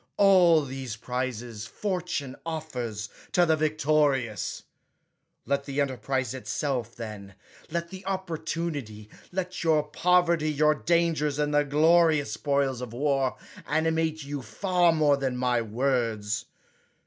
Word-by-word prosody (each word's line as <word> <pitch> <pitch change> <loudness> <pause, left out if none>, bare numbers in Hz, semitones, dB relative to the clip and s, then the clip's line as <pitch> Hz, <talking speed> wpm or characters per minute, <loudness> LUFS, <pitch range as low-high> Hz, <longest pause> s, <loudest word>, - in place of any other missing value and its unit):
All 180 -5 +6
these 130 -4 -5
prizes 120 -2 -4
fortune 180 - -3
offers 125 -10 -4 0.3
to 175 - +5
the 160 -1 +3
victorious. 150 - +1 0.8
Let 140 0 0
the 140 0 -3
enterprise 130 -2 -1
itself, 130 -3 -3
then, 105 -4 -8 0.3
let 170 +1 -3
the 190 0 -8
opportunity, 165 - -4 0.2
let 185 -1 -3
your 155 -2 +3
poverty, 170 0 +2
your 150 +1 +3
dangers, 160 -3 +1
and 150 0 0
the 145 0 +4
glorious 155 -1 +4
spoils 135 +2 0
of 120 -2 -6
war, 135 0 0 0.3
animate 160 0 0
you 140 0 -5
far 175 - +2
more 150 -3 +3
than 130 -2 -2
my 125 -1 +1
words. 115 -2 -1
145 Hz, 120 wpm, -27 LUFS, 125-160 Hz, 0.8 s, All